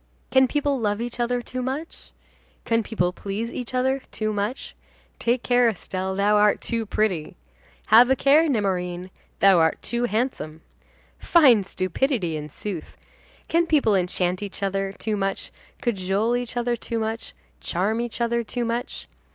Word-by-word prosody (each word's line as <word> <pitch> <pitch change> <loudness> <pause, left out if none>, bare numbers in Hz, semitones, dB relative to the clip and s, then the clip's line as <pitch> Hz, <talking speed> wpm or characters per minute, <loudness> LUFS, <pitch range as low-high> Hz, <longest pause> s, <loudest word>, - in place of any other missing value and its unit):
can 265 0 +5
people 285 0 0
love 205 -2 0
each 240 +1 -5
other 245 0 0
too 255 +1 -5
much? 270 +6 -5 0.6
can 230 0 +2
people 180 -5 -1
please 205 +5 -4
each 245 -2 -5
other 265 +2 +1
too 215 -1 -2
much? 210 +5 -3 0.4
Take 240 +1 0
care, 245 -1 +4
Estelle, 190 -2 -4
thou 205 +2 +3
art 210 0 +4
too 230 -2 -3
pretty! 190 -8 -1 0.6
Have 240 +3 +8
a 265 - +4
care, 300 +5 +4
Nemorin, 185 -6 -1 0.3
thou 195 -3 +6
art 160 0 +2
too 240 0 -1
handsome! 215 - -2 0.6
Fine 255 - +5
stupidity, 185 - -1
in 150 0 -5
sooth! 175 +2 -7 0.5
Can 335 +1 +2
people 285 -9 +3
enchant 180 0 0
each 200 0 -6
other 195 0 -1
too 215 +2 -3
much, 195 -1 -2 0.3
cajole 205 +1 0
each 245 0 -4
other 240 0 +1
too 230 0 -4
much, 225 +1 -4 0.2
charm 210 +6 -1
each 240 0 -4
other 235 0 +1
too 240 +2 -3
much? 235 +2 -4
225 Hz, 155 wpm, -24 LUFS, 195-245 Hz, 0.6 s, Have